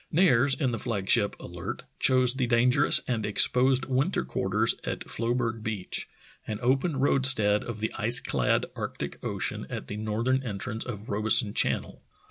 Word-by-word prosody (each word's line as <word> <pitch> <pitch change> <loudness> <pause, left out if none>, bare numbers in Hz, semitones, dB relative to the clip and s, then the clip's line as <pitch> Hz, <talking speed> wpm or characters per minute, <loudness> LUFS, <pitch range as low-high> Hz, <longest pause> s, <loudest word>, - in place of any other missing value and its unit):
Nares, 140 -6 +4
in 135 -6 -1
the 115 - -4
flag 100 -5 -4
ship 105 -3 +2
Alerty 85 -1 -7 0.2
chose 130 -2 +4
the 130 -2 -2
dangerous 125 +4 +5
and 115 -3 -2
exposed 125 +5 +4
winter 135 +8 -1
quarters - - 0
at - - -4
Floeberg 115 -1 -2
Beach, 105 -4 -4 0.4
an 110 - -4
open 135 +5 0
roadstead 130 -6 +2
of 110 -3 -7
the 110 - -2
ice 115 +4 +1
clad - - 0
Arctic - - -6
Ocean - - -4
at - - -7
the 105 - -5
northern 115 +5 -1
entrance 110 -2 -5
of 110 -3 -8
Robeson 105 0 +2
Channel. - - -1
120 Hz, 155 wpm, -27 LUFS, 110-130 Hz, 0.4 s, dangerous